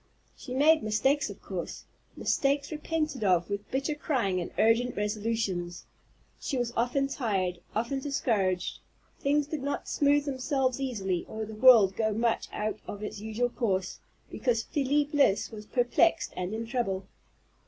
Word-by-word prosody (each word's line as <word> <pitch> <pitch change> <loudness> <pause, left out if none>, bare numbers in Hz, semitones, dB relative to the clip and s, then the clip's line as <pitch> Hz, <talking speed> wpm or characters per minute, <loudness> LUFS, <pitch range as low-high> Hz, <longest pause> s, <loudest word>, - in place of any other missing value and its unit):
She 255 - -7
made 310 +4 +5
mistakes 220 +7 +1
of - - -10
course, - - -6 0.3
mistakes 280 +1 +1
repented 305 -4 -2
of 180 -1 +2
with 200 0 -4
bitter 275 +3 -1
crying 235 - 0
and 175 - -4
urgent 230 +3 +3
resolutions. 210 -4 -2 0.5
She 275 - -2
was 240 -1 -1
often 250 +4 +1
tried, 195 -10 -1
often 235 +5 -1
discouraged; 205 -10 0 0.4
things 290 +1 +2
did 300 0 -4
not 285 +1 -3
smooth 290 0 +2
themselves 265 -1 0
easily, 195 -9 -1
or 220 0 -4
the 220 - -9
world 215 -4 +7
go 220 -1 +1
much 230 +1 0
out 215 +1 -3
of 205 +1 -6
its 210 - -5
usual 220 +3 -1
course, 195 -7 -1 0.3
because 230 -3 0
Felie 285 +2 +1
Bliss 285 -9 +2
was 215 -1 -9
perplexed 260 +7 +2
and 180 +1 -3
in 225 +1 -3
trouble. 210 -6 -2
235 Hz, 150 wpm, -29 LUFS, 210-275 Hz, 0.5 s, world